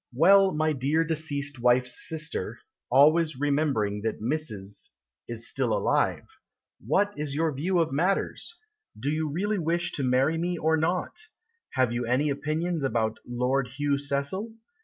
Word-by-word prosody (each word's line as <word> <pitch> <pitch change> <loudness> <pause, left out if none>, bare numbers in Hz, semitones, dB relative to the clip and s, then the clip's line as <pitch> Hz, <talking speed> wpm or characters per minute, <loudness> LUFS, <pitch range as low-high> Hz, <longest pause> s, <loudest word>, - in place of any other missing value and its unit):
Well, 195 +6 +6
my 155 -1 +1
dear 145 +4 +1
deceased 145 -4 -3
wife's 125 0 +2
sister 155 - -4 0.3
(Always 155 +2 +4
remembering 140 -9 0
that 110 +1 -2
Mrs. 110 -6 -3 0.4
is 115 -1 -3
still - - 0
alive), - - +1 0.6
What 200 - +1
is 145 -2 -3
your 160 +1 +1
view 175 +7 0
of 165 -2 +2
matters? 195 - -1 0.4
Do 140 +6 -1
you 155 0 -1
really 200 +7 -1
wish 170 +1 -1
to 140 - -3
marry 130 +6 +2
me 175 +1 -1
or 160 0 +2
not? 170 - -1 0.5
Have 130 -3 +2
you 120 0 -2
any 140 +5 +2
opinions 155 +3 -2
about 110 -4 0
Lord 125 +2 0
Hugh 145 -1 +1
Cecil? 145 +11 -3
145 Hz, 145 wpm, -27 LUFS, 130-165 Hz, 0.6 s, Well